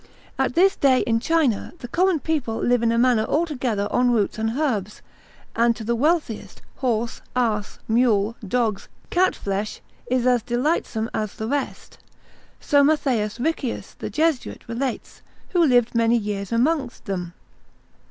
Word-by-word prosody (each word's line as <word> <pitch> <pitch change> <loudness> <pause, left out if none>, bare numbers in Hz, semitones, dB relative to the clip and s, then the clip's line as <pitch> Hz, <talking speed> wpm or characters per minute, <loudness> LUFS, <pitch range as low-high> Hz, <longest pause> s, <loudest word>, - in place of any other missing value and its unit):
At - - 0
this 380 +3 +4
day 260 -2 +3
in 230 -1 +1
China 285 -5 +1
the 245 - -8
common 360 +5 +2
people 285 -8 -2
live 245 -1 +2
in 230 -1 +2
a 230 - +1
manner 240 -2 +3
altogether 255 -9 -1
on 245 0 +3
roots 220 -3 +1
and 225 +3 -1
herbs, 215 -10 -2 0.5
and 235 0 +3
to 225 - -7
the 235 +2 0
wealthiest, 240 - -1
horse, 235 -3 -1
ass, 220 -4 0
mule, 225 -2 +2
dogs, 220 -1 -1 0.2
cat 370 +1 +3
flesh, 200 +2 -3 0.3
is 250 -1 +1
as 250 -2 +3
delightsome 240 -2 -1
as 215 -2 -3
the 220 - -4
rest, 280 +1 -4 0.6
so 285 -1 +3
Mat. 300 +1 +3 0.4
Riccius 275 -2 -2
the - - -4
Jesuit 315 -4 -1
relates, 240 +2 -4 0.3
who 350 -3 +3
lived 245 -5 +3
many 230 0 +3
years 205 -2 -4
amongst 255 +2 0
them. 180 -4 -4
240 Hz, 150 wpm, -23 LUFS, 220-285 Hz, 0.6 s, this